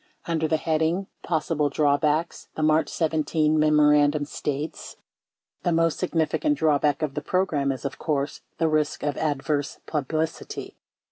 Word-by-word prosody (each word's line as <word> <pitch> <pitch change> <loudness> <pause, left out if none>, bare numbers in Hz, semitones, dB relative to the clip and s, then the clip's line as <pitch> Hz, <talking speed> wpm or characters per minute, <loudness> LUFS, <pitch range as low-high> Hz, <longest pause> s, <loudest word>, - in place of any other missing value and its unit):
Under 160 -2 0
the 160 - +2
heading, 160 +4 0 0.2
"Possible 155 -2 0
Drawbacks," 150 +3 +1
the 155 - -2
March 155 +1 +3
17 155 -1 +1
memorand 150 -1 +4
u 150 - -1
m - - -1
states: 150 +1 -4 0.7
The 175 - 0
most 165 -1 +2
significant 180 - 0
drawback 150 - +2
of 145 -3 -1
the 150 - -3
program 150 -5 0
is, 135 +1 -6
of 140 - -4
course, 145 -2 -2 0.2
the 165 - +2
risk 155 -1 0
of 145 -1 -1
adverse 145 -1 -1
publicity. 155 +2 -3
155 Hz, 145 wpm, -25 LUFS, 145-160 Hz, 0.7 s, memorand